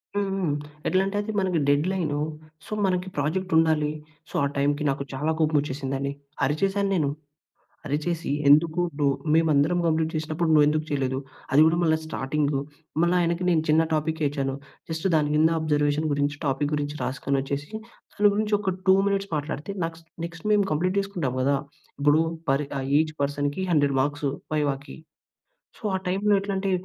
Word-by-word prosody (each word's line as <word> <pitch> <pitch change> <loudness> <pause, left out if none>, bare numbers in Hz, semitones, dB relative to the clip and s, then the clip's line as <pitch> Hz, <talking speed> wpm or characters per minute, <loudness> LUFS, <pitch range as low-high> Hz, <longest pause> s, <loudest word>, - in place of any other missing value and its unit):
హుహు. 195 -2 0 0.4
ఎట్లంటే 195 +2 +1
అది 215 +1 -4
మనకి 185 -4 +1
డెడ్‌లైను. 150 +1 +1 0.5
సో, - - -14
మనకి 185 -1 0
ప్రాజెక్ట్ 180 +6 -1
ఉండాలి. 160 -2 +3 0.4
సో, - - -15
ఆ - - +3
టైంకి 145 +2 +1
నాకు 140 0 -1
చాలా 150 +4 0
కోపం 155 -1 +2
వచ్చేసిందండి. 140 -1 -3 0.3
అరిచేశాను 195 +8 +1
నేను. 150 -6 +1 0.8
అరిచేసి, 155 +4 -2 0.2
ఎందుకు 155 +3 +5 0.2
డొ 145 - +3 0.3
మేమందరం 160 +1 +3
కంప్లీట్ 160 -1 +1
చేసినప్పుడు, 155 +2 -1
నువ్వు 150 -1 +6
ఎందుకు 155 +1 0
చేయలేదు, 135 -2 -1 0.3
అది 140 +3 +6
కూడా 165 +1 +3
మళ్ళా 160 -1 +3
స్టార్టింగు. 145 -1 -1 0.4
మళ్ళా 175 +1 +3
ఆయనకి 170 +1 0
నేను 165 -3 +3
చిన్న 155 +1 +5
టాపిక్కే 155 0 0
ఇచ్చాను. 135 -2 -2 0.3
జస్ట్ 160 +3 -1
దాని 150 -2 +2
కింద 155 +1 +5
అబ్జర్వేషన్ 150 0 +1
గురించి 145 0 0
టాపిక్ 145 +1 0
గురించి 145 0 -3
రాసుకొనోచ్చేసి, 140 +2 -2 0.4
దాని 205 0 +5
గురించి 210 0 +1
ఒక 190 -2 -1
2 190 - +7
మినిట్స్ 200 0 -1
మాట్లాడితే, 150 +5 -4
నాక్స్ 165 0 -8 0.2
నెక్స్ట్ 170 +2 -10
మేము 205 -1 +3
కంప్లీట్ 185 +5 0
చేసుకుంటాం 175 -10 -3
కదా! 140 +2 +2 0.4
ఇప్పుడు 145 +2 +4 0.3
పర్ 135 +2 +2
ఆహ్, 135 - -4
ఈచ్ 155 -1 -1
పర్సన్‌కి, 145 +4 -1
100 145 -3 +3
మార్క్స్ 145 +1 -1 0.3
వైవాకి. 145 -2 -2 0.8
సో, - - -22
ఆ - - -1
టైంలో 200 +3 +2
ఎట్లాంటే, 195 -1 -1
155 Hz, 155 wpm, -25 LUFS, 145-175 Hz, 0.8 s, 2